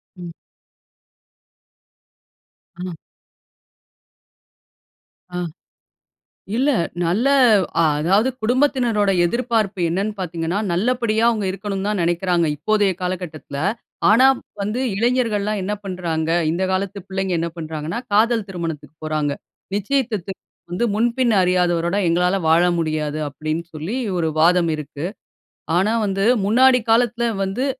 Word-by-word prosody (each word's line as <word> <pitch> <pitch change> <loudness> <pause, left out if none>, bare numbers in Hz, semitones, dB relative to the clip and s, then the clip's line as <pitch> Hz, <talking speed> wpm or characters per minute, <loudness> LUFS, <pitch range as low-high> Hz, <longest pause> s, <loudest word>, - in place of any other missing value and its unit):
ம். 175 -2 -8 2.4
அ. 180 +1 -5 2.5
அ. - - -2 1.2
இல்ல 265 +5 +2 0.3
நல்ல 190 +10 +1 0.6
அதாவது 175 - +2
குடும்பத்தினருடைய 235 -5 +2
எதிர்பார்ப்பு 225 -2 -1
என்னன்னு 195 +5 -1
பாத்தீங்கனா, 170 0 -2
நல்லபடியா 225 +3 +1
அவங்க 215 -4 -1
இருக்கன்னு 195 +1 -3
தான் 210 -2 -1
நினைக்கிறாங்க, 175 0 +1
இப்போதைய 205 +5 +2
காலகட்டத்துல. 175 -6 -5 0.5
ஆனா 240 +5 +6 0.3
வந்து 210 +5 -2 0.2
இளைஞர்கள்லாம் 215 -2 0
என்ன 205 +3 -2
பண்றாங்க. 170 -4 -2 0.2
இந்த 175 +3 -1
காலத்து 195 +1 -2
பிள்ளைங்க 190 -1 -2
என்ன 170 +1 -1
பண்றாங்கனா, 160 +2 -4 0.2
காதல் 225 +1 +3
திருமணத்துக்கு 165 -4 -5
போறாங்க. 155 -2 -1 0.4
நிச்சயத்ததுக்கு 210 -3 -1 0.4
வந்து 185 +7 0
"முன்பின் 235 +2 +2
அறியாதவரோட 175 -1 +1
எங்களால 180 +3 +2
வாழ 165 +2 +5 0.2
முடியாது" 155 -2 -2
அப்டின் 155 +3 -3
சொல்லி 160 +9 -4 0.2
ஒரு 165 -2 0
வாதம் 170 +1 +4
இருக்கு. 150 0 -6 0.7
ஆனா 200 +5 +2
வந்து 195 -1 -1 0.2
முன்னாடி 255 +4 +5
காலத்துல 235 0 +2 0.2
வந்து 195 +8 -2
190 Hz, 100 wpm, -21 LUFS, 170-220 Hz, 2.5 s, ஆனா